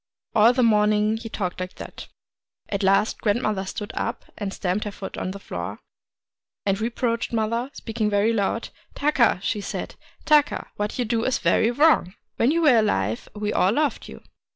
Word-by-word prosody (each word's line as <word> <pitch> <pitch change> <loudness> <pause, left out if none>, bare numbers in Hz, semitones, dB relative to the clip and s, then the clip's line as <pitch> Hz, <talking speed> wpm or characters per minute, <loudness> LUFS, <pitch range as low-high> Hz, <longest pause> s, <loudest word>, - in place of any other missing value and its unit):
All 220 +2 +6
the 250 0 +1
morning 210 -1 +3
he 225 0 -7
talked 185 -4 -3
like 185 0 -5
that. - - -9 0.6
At 200 0 -2
last 195 +2 +2
grandmother 210 -3 0
stood 205 +2 -5
up, 230 - -3
and 200 -2 -4
stamped 190 +2 -2
her 210 - -3
foot 195 -1 -7
on - - -3
the 195 - -5
floor, 95 - -6 0.9
and 195 +1 0
reproached 235 0 -1
mother, 230 +3 -1
— - - -41
speaking 220 -2 -2
very 205 +2 +2
loud. 225 +2 -1
' - - -34
Taka! 280 -9 +3
' - - -15
she 210 - -1
said, - - -5 0.2
' - - -30
Taka, 300 -2 +3
what 210 0 -3
you 245 - 0
do 225 0 0
is 260 - +1
very 225 - +2
wrong. 245 - +3 0.2
When 235 - +3
you 335 +3 +2
were 275 -6 +6
alive 110 - 0
we 210 0 -2
all 190 +3 +3
loved 295 +2 0
you. - - -11
215 Hz, 195 wpm, -24 LUFS, 200-235 Hz, 0.9 s, All